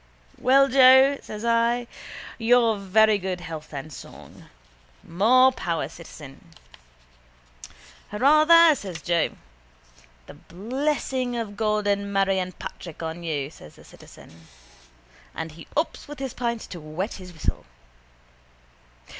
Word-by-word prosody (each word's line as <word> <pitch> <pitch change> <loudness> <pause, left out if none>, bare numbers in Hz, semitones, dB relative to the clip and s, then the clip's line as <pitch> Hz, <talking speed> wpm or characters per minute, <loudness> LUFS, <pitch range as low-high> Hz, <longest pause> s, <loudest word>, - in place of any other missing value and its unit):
—Well, 275 +2 +4
Joe, 265 +1 +6
says 215 +2 -8
I, 235 +1 +1 0.5
your 230 -1 +3
very 210 +2 +3
good 185 -1 -4
health 160 -3 -8
and 145 +1 -7
song. - - -13 0.6
More 245 +9 +4
power, 170 - -3
citizen. 155 -1 -13 1.6
—Hurrah, 285 +8 +4
there, 335 0 +7
says 190 - -7
Joe. 170 -2 0 0.9
—The - - -12
blessing 255 - -3
of 220 -3 -5
God 210 -1 0
and 200 0 -1
Mary 195 -1 +1
and 185 -1 -5
Patrick 170 -2 -9
on 160 +1 -5
you, 150 -4 -3
says 75 - -15
the - - -17
citizen. 80 0 -17 0.9
And 160 - -5
he 165 +1 -13
ups 315 - -2
with 295 0 -9
his 265 -2 -5
pint 235 -2 -3
to 175 - -9
wet 155 +7 -5
his 180 -1 -11
whistle. 160 -3 -4
205 Hz, 125 wpm, -24 LUFS, 170-255 Hz, 1.6 s, there